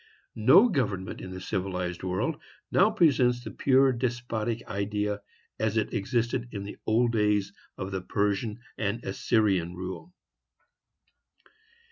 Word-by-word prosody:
No 130 - +6
government 105 - -2
in 95 - -7
the 95 0 -6
civilized 90 -2 -3
world 95 - -2 0.3
now 195 +3 +5
presents 130 - +3
the - - -6
pure 135 0 +4
despotic 120 -2 -2
idea, 105 +1 -2 0.4
as 110 0 0
it 110 - 0
existed 120 +3 -1
in 100 -2 -5
the 100 - -8
old 115 +2 +3
days 105 -3 +1 0.2
of 95 0 -5
the 95 -1 -2
Persian 105 +4 -1 0.2
and 110 +2 -1
Assyrian 95 -3 +1
rule. 95 - -7
105 Hz, 125 wpm, -28 LUFS, 95-120 Hz, 0.4 s, No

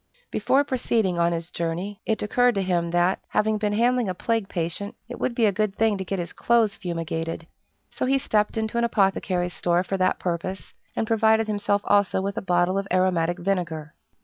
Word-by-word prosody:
Before 265 +6 +2
proceeding 230 -9 0
on 170 0 +3
his 165 0 -4
journey, 175 +5 -3
it 220 -1 0
occurred 245 +3 +3
to 195 - 0
him 175 -2 0
that, 175 +2 +2
having 215 0 +1
been 210 -1 0
handling 240 0 +2
a 185 - -2
plague 225 +1 -1
patient, 170 +4 -3
it 245 - -8
would 245 - -1
be 235 - +3
a 205 - +4
good 205 0 -1
thing 225 -2 +2
to - - -2
get 195 +1 -3
his 175 -1 -5
clothes 230 -3 +2
fumigated; 165 -3 -4 0.5
so - - -2
he 270 +1 +3
stepped 215 -5 0
into 220 +1 -1
an - - +1
apothecary's 190 -5 +1
store 175 0 +1
for 195 +1 -2
that 185 0 +2
purpose, 180 +2 -4 0.2
and - - 0
provided 220 0 +3
himself 205 -1 0
also 200 -2 +3
with 200 +1 -2
a - - -2
bottle 180 0 +2
of 195 - -5
aromatic 175 -2 +2
vinegar. 170 -5 -2
195 Hz, 200 wpm, -25 LUFS, 175-220 Hz, 0.5 s, a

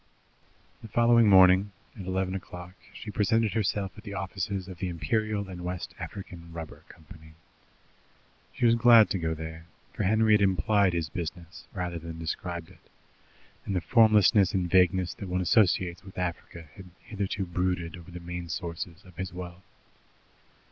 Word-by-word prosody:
The - - -9
following 115 0 +4
morning, 95 +1 +6 0.2
at 95 -5 -8
eleven 95 0 -1
o'clock, 90 -1 -8 0.2
she 105 - -8
presented 110 +1 +1
herself 100 -2 -1
at - - -14
the 100 -3 -7
offices 95 0 -3
of 90 -3 -10
the 95 - -2
Imperial 100 +6 -1
and 90 -2 -8
West 90 0 -5
African 85 -4 -8
Rubber 80 -1 -9
Company. 80 0 -15 1.2
She - - -1
was 115 - +6
glad 115 -1 +6
to 95 - 0
go 80 -1 -1
there, 80 +1 -8 0.3
for - - -4
Henry 110 +2 +3
had 105 - +4
implied 100 +1 +3
his 85 -3 -2
business 85 +1 -7
rather 90 -2 -4
than 80 0 -8
described 85 +1 -5
it, 90 - -22 0.7
and 100 - -3
the - - +2
formlessness 105 -3 +4
and 90 -2 0
vagueness 90 0 +3
that 100 - -8
one 90 0 0
associates 90 -2 +2
with 95 0 -13
Africa 85 -2 -5
had 95 -1 -12
hitherto 100 -2 -3
brooded 90 -2 -2
over 85 0 -12
the 90 0 -8
main 85 0 -6
sources 85 +1 -5
of 90 -3 -17
his 95 0 -4
wealth. 90 0 -8
90 Hz, 160 wpm, -28 LUFS, 85-100 Hz, 1.2 s, morning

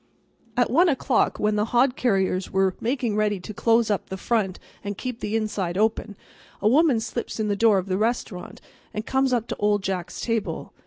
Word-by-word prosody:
At 245 - +2
1 340 +7 +5
o'clock 265 -3 +1
when 210 0 +1
the 210 - +2
hod 245 +3 +2
carriers 190 -6 0
were 190 -1 +2
making 240 -2 -1
ready 210 -2 +1
to 215 - -7
close 230 +1 +2
up 205 - -2
the 190 - -4
front 195 -3 0 0.3
and 205 -1 -4
keep 250 -2 -5
the 210 +1 -3
inside 200 -5 -2
open, 215 0 0 0.4
a 205 - +1
woman 275 0 +4
slips 230 +1 -5
in 215 -1 0
the 205 - +1
door 215 -1 +4
of 185 - -1
the 190 0 -1
restaurant 220 -5 -3 0.3
and 215 +1 -3
comes 265 0 +1
up 240 -3 +1
to - - -2
Old 205 -1 +1
Jack's 185 -3 -3
table. 230 -3 -3
215 Hz, 200 wpm, -24 LUFS, 195-240 Hz, 0.4 s, 1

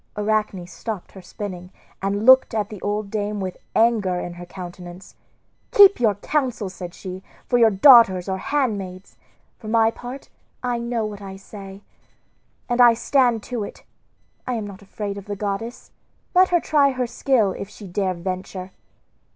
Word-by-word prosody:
Arachne 210 -3 -1
stopped 180 +3 -7
her 190 - -12
spinning 185 -2 -7 0.3
and 200 +2 -1
looked 260 -2 +6
at 210 -1 -1
the 210 -4 -9
old 205 0 -2
dame 210 -1 -2
with 185 -2 -4 0.2
anger 215 -6 +2
in 175 - -5
her 175 0 -10
countenance. 175 0 -10 0.6
"Keep 400 -1 +7
your 220 -4 +3
counsel," 250 -3 -1
said 180 -2 -8
she, 185 -1 -7 0.2
"for 245 - +2
your 230 -1 +6
daughters 200 -4 +6
or 190 -1 -2
handmaids; 200 -9 -2 0.4
for 215 - -10
my 225 0 +3
part 245 +4 -9 0.4
I 245 -1 -1
know 235 -1 -2
what 210 -1 -7
I 195 -1 -8
say, 195 0 -11 0.8
and 245 0 +2
I 240 -1 +7
stand 240 -3 +2
to 240 -4 -4
it. - - -9 0.6
I 250 - -1
am 220 -2 -3
not 200 -1 -10
afraid 200 0 -5
of 195 - -13
the 205 -1 -4
goddess; 205 +4 -5 0.4
let 370 0 +5
her 350 - +3
try 290 -3 +3
her 255 -1 -1
skill, 235 -4 +1
if 195 - -7
she 210 - -12
dare 185 0 -1
venture." 185 +1 -5
205 Hz, 165 wpm, -22 LUFS, 190-235 Hz, 0.8 s, Keep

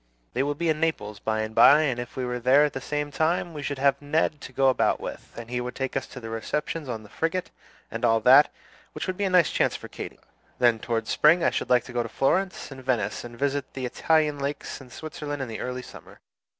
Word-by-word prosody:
They 125 - 0
will 145 +1 0
be 170 +3 -2
in 155 -1 +1
Naples 105 -11 -1
by 110 +1 -1
and 110 0 -4
by, 140 +7 +7
and 130 -5 0
if 120 0 -7
we 130 - -1
were 125 0 -3
there 130 +5 +5
at 150 - -3
the 135 - -5
same 145 +1 -3
time 165 +3 0
we 150 - -6
should 145 -1 -3
have 140 +1 +2
Ned 150 0 0
to - - -9
go 135 +1 +3
about 130 - +2
with; - - -8
and 115 -1 -7
he 125 +1 -2
would 125 +1 -5
take 135 -1 -3
us 135 - -2
to - - -9
the 115 -2 -7
receptions 150 +6 -3
on 110 -2 -4
the - - -13
frigate, 165 - -2 0.4
and - - -5
all 115 0 +4
that, 135 +4 +7 0.4
which - - -4
would 185 - -2
be 200 - -1
a - - +1
nice 180 -3 +4
chance - - +1
for - - -8
Katy. - - -8 0.4
Then 120 -2 +3
toward 115 -1 -2
spring 165 +3 +4
I - - +3
should - - -3
like 125 -2 +4
to 125 - -11
go 120 - +1
to 115 - -5
Florence 185 - 0
and 130 -1 -9
Venice, 115 -5 -1
and 120 -1 -9
visit 140 0 -1
the 130 -1 -3
Italian 150 +3 +1
lakes 140 0 -4
and 125 -2 -14
Switzerland 150 +1 -6
in 135 - -3
the 115 - -6
early 125 0 -4
summer. - - -13
135 Hz, 255 wpm, -26 LUFS, 120-150 Hz, 0.4 s, by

